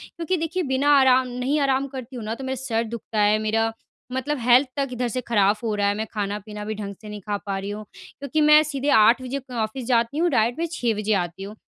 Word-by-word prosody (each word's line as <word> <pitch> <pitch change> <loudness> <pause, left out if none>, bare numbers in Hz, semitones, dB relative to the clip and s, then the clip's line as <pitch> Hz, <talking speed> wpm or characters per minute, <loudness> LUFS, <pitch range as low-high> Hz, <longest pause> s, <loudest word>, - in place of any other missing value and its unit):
क्योंकि 345 +2 -1
देखिए 330 +3 -2
बिना 275 0 +1
आराम 260 -1 +4
नहीं 250 +4 -1
आराम 275 -1 +1
करती 260 -1 -8
हूँ 235 - -6
ना 220 +2 -3
तो 270 - -9
मेरा 265 0 -2
सर 230 -3 0
दुखता 225 -1 -5
है, 210 +1 +4
मेरा 225 +1 0 0.4
मतलब 260 +3 -2
हेल्थ 250 +3 +5
तक 275 -2 0
इधर 245 0 -1
से 250 +2 -3
खराब 210 -3 +2
हो 220 - 0
रहा 205 -1 +1
है, 200 - +1
मैं 220 - -2
खाना-पीना 210 0 -4
भी 215 +1 -3
ढंग 200 -1 -6
से 215 - -10
नहीं 210 0 -7
खा 205 +2 -3
पा 195 -1 -2
रही 195 +1 -5
हूँ। 210 +1 -6
क्योंकि 285 +2 -4
मैं 300 0 +7
सीधे 285 -1 -2
8 230 0 +5
बजे 255 +2 -4
क 265 -1 -18
ऑफ़िस 230 +2 -3
जाती 235 +3 +1
हूँ, 345 +2 +2
डायरेक्ट 240 -1 +1
मैं 335 - 0
6 240 -8 0
बजे 215 0 0
आती 175 0 -2
हूँ। 205 +2 -8
240 Hz, 250 wpm, -23 LUFS, 215-270 Hz, 0.4 s, मैं